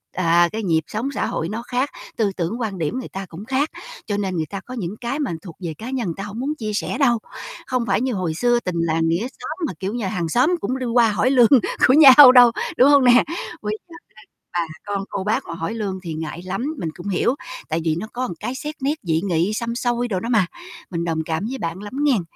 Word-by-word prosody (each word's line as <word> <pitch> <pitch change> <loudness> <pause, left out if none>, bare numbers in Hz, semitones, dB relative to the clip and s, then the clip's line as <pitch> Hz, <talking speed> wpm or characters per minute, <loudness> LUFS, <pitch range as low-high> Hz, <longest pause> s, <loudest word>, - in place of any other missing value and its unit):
à, 170 -1 +3
cái 220 0 -4
nhịp 165 -3 +2
sống 230 +6 -3
xã - - 0
hội 165 - -2
nó 220 +2 -4
khác, 250 +3 -1 0.3
tư 210 -3 +1
tưởng 190 +7 -2
quan 205 -5 -3
điểm 165 +11 -2
người - - -7
ta 195 0 -6
cũng 185 +6 -9
khác, 270 +4 0 0.4
cho 205 -1 -2
nên 190 -3 -2
người 160 -1 -1
ta 195 - -5
có 255 - -8
những 205 -3 -4
cái 245 +5 -2
mà 285 - -1
thuộc 170 -5 -10
về 165 -2 -3
cá 230 +3 -7
nhân 255 -6 -2
người 165 - -3
ta 195 - -4
hổng 205 +2 -7
muốn 290 +4 -2
chia 215 -6 -4
sẻ 205 - -2
đâu. 240 -5 +3 0.5
Không 250 -2 0
phải 200 +1 +1
như 255 -1 0
hồi 180 -5 -2
xưa 240 +7 +2
tình 180 -6 -4
làng 165 0 +1
nghĩa 165 +3 +1
xóm 305 +4 -8
mà, - - -5
kiểu 195 +2 -3
như, 235 -4 -2
hàng 175 -3 -2
xóm 265 - +3
cũng 260 +1 -2
đi 255 - -3
qua 235 -2 +3
hỏi 210 +5 +1
lương 245 -4 +6 0.4
của 255 - +5
nhau 280 -2 +10
đâu, 245 -2 +8 0.3
đúng 260 +3 +6
hông 285 -2 +6
nè? 245 -1 +6 0.4
Bây 215 +1 -3
giờ 335 - -12 0.4
các - - -60
bà 175 -1 0 0.3
con 195 - -2
cô 190 - -3
bác 225 +6 0
mà 170 - -5
hỏi 165 +6 -4
lương 200 -4 -3
thì 165 -3 -5
ngại 160 +2 -5
lắm, 195 +6 -3 0.2
mình 165 - -2
cũng 175 - -8
hiểu 235 +7 +1 0.3
tại 160 +1 0
vì 160 -1 +1
nó 215 - -5
có 255 +1 -2
cái 255 - -4
xét 300 +3 -5
nét 280 +2 +2
dị 165 -3 0
nghị 180 +1 0
xăm 235 +1 -3
xôi 240 0 0
đồ 195 -5 -1
đó 230 - -5
mà, 210 -6 +4 0.5
mình 170 -1 -2
đồng 160 -2 -1
cảm 160 +5 -2
với 265 - -4
bạn 170 -4 -4
lắm 205 - -8
nghen, 265 -9 +3
215 Hz, 260 wpm, -21 LUFS, 175-250 Hz, 0.5 s, nhau